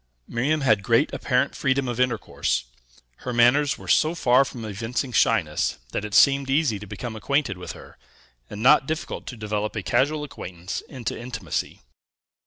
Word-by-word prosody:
Miriam 145 +6 0
had 110 -7 +3
great 115 +8 +2
apparent 135 +1 0
freedom 135 -2 0
of 120 -1 -3
intercourse; 115 - 0 0.5
her 125 - -5
manners 125 +5 +4
were - - -12
so 160 +2 +3
far 130 -4 +4
from 120 -4 -7
evincing 115 +5 -3
shyness, - - +1
that - - -3
it 105 -1 -4
seemed 140 +1 +5
easy 135 -7 +1
to 105 - -10
become 120 +3 -6
acquainted 140 -1 0
with 90 - -6
her, - - -14 0.5
and 105 +2 -6
not 135 +1 +6
difficult 155 0 -4
to 125 - -7
develop 105 0 -3
a 110 - -3
casual 150 - +1
acquaintance 90 -9 -6
into 120 -4 -4
intimacy. 105 - -5
125 Hz, 165 wpm, -24 LUFS, 105-140 Hz, 0.5 s, not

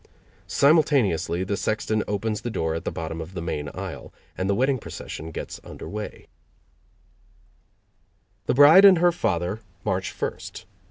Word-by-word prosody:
Simultaneously 120 - +3
the 100 +2 -2
sexton 110 +1 -1
opens 105 +1 -2
the 120 - -4
door 80 -7 -1
at 80 - -5
the - - -1
bottom 80 0 -5
of 85 +4 -9
the - - -3
main 75 -3 -3
aisle, - - -7 0.2
and 95 +1 -2
the 100 - +2
wedding 130 +3 +1
procession 80 -3 -8
gets 80 - -7
under - - -9
weigh. 105 0 -7 2.2
The - - +2
bride 145 +8 +8
and 195 -3 +9
her 175 +1 +4
father 90 - -1 0.3
march 95 -3 -1
first. - - -6
100 Hz, 150 wpm, -24 LUFS, 85-130 Hz, 2.2 s, and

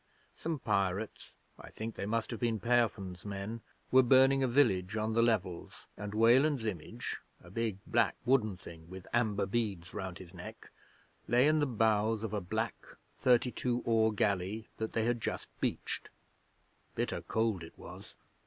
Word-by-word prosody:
Some 165 -1 -3
pirates 100 -3 -1 0.2
I - - -10
think 110 +1 -5
they 100 - -4
must 115 +2 -1
have 115 - -4
been 115 -2 0
Peofn's 105 -6 +1
men 100 +3 -5 0.3
were 130 - +8
burning 135 +2 +5
a 130 - +3
village 110 -7 +2
on 110 +1 0
the 115 - +4
Levels, 100 -7 -1
and 105 +1 -6
Weland's 125 +3 +4
image 110 +4 -4 0.2
a 85 - -15
big, 110 -2 -1
black 115 -3 +2
wooden 115 -7 +2
thing 85 -2 -12
with 95 0 -9
amber 110 -4 +2
beads 100 -4 -2
round 95 -3 -5
his 90 -1 -12
neck 90 -1 -10 0.6
lay 120 +3 +4
in 155 0 +4
the 145 - +2
bows 110 -2 +2
of 110 - -3
a 105 - -1
black 90 - -3 0.4
thirty 125 0 +4
two 125 0 -1
oar 110 -1 +3
galley 105 +1 0
that 110 0 -3
they 115 - +1
had 120 -1 0
just - - -3
beached. - - -2 0.9
Bitter - - -1
cold 110 -4 0
it 80 - -12
was! - - -11
110 Hz, 165 wpm, -32 LUFS, 100-120 Hz, 0.9 s, were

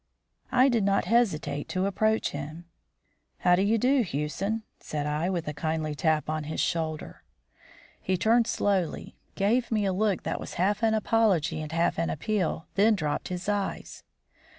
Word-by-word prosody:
I 255 +1 +5
did 235 -5 +2
not 200 0 +2
hesitate 205 -11 +1
to 185 +1 0
approach 215 +3 +1
him. 155 +4 -7 0.8
"How 180 0 +5
do 180 - +1
you 210 +3 +3
do, 255 +4 +3
Hewson?" 190 - -2 0.2
said 150 -1 -4
I, 150 +4 -1
with 175 -4 -2
a 150 - -2
kindly 155 0 -2
tap 155 +1 +1
on 155 0 -2
his 155 - -4
shoulder. 160 -2 -2 0.8
He 185 0 0
turned 230 +4 +3
slowly, 190 -5 -1 0.2
gave 230 +5 +1
me 215 -2 +1
a 190 - +1
look 200 -1 0
that - - -2
was - - -7
half 205 +5 +1
an 220 -1 +3
apology 210 -8 +2
and 155 0 -6
half 165 0 +1
an 165 - 0
appeal, 185 -1 -1
then 215 +2 +4
dropped 150 -6 -2
his 180 +1 -5
eyes. 205 -2 -3
185 Hz, 170 wpm, -27 LUFS, 155-215 Hz, 0.8 s, I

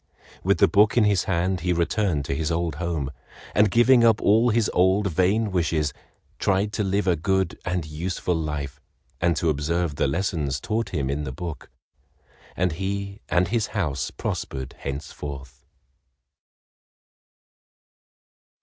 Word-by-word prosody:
With - - +3
the - - +5
book 105 +3 +4
in 120 - +6
his 100 -3 +2
hand 90 +1 0
he 90 +2 -1
returned 85 -3 0
to - - -2
his 75 +2 -1
old 85 -2 -1
home, 80 -6 -2 0.4
and 105 0 +4
giving 120 +3 +5
up 115 -2 +5
all 115 +4 +4
his 115 -1 +2
old 95 +2 +3
vain 100 +6 +2
wishes, 80 -4 0 0.5
tried 100 +2 +1
to 105 - 0
live 100 +1 0
a 90 -2 +3
good 95 +1 0
and 90 -2 -1
useful 85 +4 -2
life 75 -4 -4 0.4
and 85 0 +3
to 80 +2 +1
observe 75 +1 -1
the - - +2
lessons 75 -4 -1
taught 110 - -2
him 70 -7 -2
in 70 +2 -2
the 65 - -4
book, 85 +2 -7 0.9
and 90 0 +1
he 100 +3 -4
and 90 0 +2
his 115 -1 0
house 75 -7 -1
prospered 65 -2 -4
henceforth. 70 -1 -7
90 Hz, 145 wpm, -24 LUFS, 75-100 Hz, 0.9 s, in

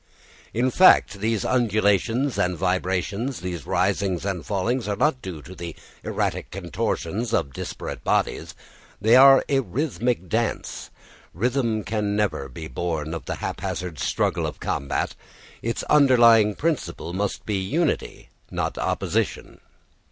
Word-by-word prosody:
In 125 +3 +1
fact, 125 - +5
these 110 0 0
undulations 115 +2 +1
and 90 -1 +1
vibrations, 95 - -1
these 90 -5 -5
risings 95 +1 0
and 95 -4 -2
fallings, 110 +4 -1
are 100 - 0
not 130 +3 +1
due 85 -6 -7
to 90 - -10
the 85 -3 -7 0.3
erratic - - -2
contortions 95 +4 -2
of 70 - -1
disparate - - -6
bodies, - - 0 0.4
they 110 +4 +5
are 135 +1 +8
a 135 - +2
rhythmic 125 - -1
dance. 115 +4 -2 0.5
Rhythm 115 +1 0
never 105 -6 0
can 70 - -11
be 80 +4 -7
born 80 +2 -3
of 85 - -6
the - - -3
haphazard 85 -2 -4
struggle - - 0
of - - -7
combat. 70 - -2 0.5
Its 115 0 -2
underlying 120 -7 +5
principle 95 - -2
must 100 +1 -2
be 105 -2 -1
unity, 145 - -1 0.2
not - - -3
opposition. - - -2
105 Hz, 130 wpm, -24 LUFS, 90-120 Hz, 0.5 s, are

